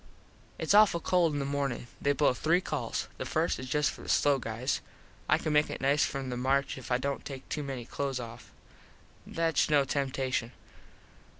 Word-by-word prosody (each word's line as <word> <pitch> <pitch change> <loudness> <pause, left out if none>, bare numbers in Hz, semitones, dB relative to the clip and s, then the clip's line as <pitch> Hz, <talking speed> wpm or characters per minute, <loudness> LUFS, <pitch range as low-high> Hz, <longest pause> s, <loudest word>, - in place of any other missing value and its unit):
Its - - +1
awful 205 -4 +6
cold 175 -1 +2
in - - -1
the 140 - -1
mornin. 140 -3 -2 0.2
They 140 - +3
blow 145 -2 +3
three 165 +7 +2
calls. 145 -10 -3
The - - -3
first - - 0
is 130 0 -6
just 150 0 +2
for - - -11
the - - -9
slow 140 -2 +3
guys. 120 +3 -2 0.5
I - - +5
can 155 - -2
make 150 0 +3
it - - -5
nice 140 +2 +3
from 135 -2 -2
the 125 - -3
march 135 +2 +1
if 130 -1 -9
I 125 - +4
dont 140 +2 -3
take 135 -2 -8
too 150 - -2
many 135 -4 -5
close 135 0 -3
off. 120 0 -9 0.8
Thats 165 -3 +1
no 145 -2 +4
temtashun. 130 -3 -1
140 Hz, 195 wpm, -30 LUFS, 130-150 Hz, 0.8 s, awful